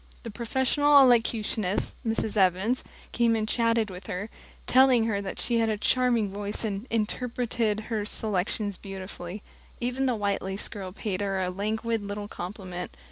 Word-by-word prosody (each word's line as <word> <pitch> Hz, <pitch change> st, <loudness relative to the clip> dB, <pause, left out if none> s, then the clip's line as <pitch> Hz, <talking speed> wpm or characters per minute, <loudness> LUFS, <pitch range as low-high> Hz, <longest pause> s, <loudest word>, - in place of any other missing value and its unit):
The 230 Hz, -, -6 dB
professional 265 Hz, +6 st, +3 dB
elocutionist, 225 Hz, -6 st, +3 dB
Mrs. 225 Hz, -2 st, -1 dB
Evans, 195 Hz, +5 st, +2 dB, 0.3 s
came 230 Hz, -1 st, +3 dB
and 215 Hz, -1 st, -1 dB
chatted 230 Hz, -2 st, +2 dB
with 180 Hz, 0 st, -9 dB
her, 205 Hz, +2 st, -4 dB, 0.3 s
telling 255 Hz, -3 st, +5 dB
her 205 Hz, -3 st, 0 dB
that 195 Hz, -, -5 dB
she 235 Hz, -1 st, +1 dB
had 225 Hz, -1 st, +2 dB
a 215 Hz, -, 0 dB
charming 235 Hz, -2 st, +2 dB
voice 205 Hz, +2 st, -3 dB
and 205 Hz, +2 st, -3 dB
"interpreted" 230 Hz, -1 st, -1 dB
her 220 Hz, -1 st, -2 dB
selections 205 Hz, -1 st, -1 dB
beautifully. 190 Hz, 0 st, -7 dB, 0.4 s
Even 250 Hz, +2 st, 0 dB
the 250 Hz, -, +2 dB
white 205 Hz, -2 st, 0 dB
lace 190 Hz, +1 st, -3 dB
girl 195 Hz, -3 st, -7 dB
paid 200 Hz, 0 st, -3 dB
her 195 Hz, -1 st, 0 dB
a 180 Hz, -1 st, -1 dB
languid 220 Hz, +4 st, -1 dB
little 205 Hz, 0 st, -5 dB
compliment. 180 Hz, -2 st, -6 dB
215 Hz, 155 wpm, -27 LUFS, 200-235 Hz, 0.4 s, telling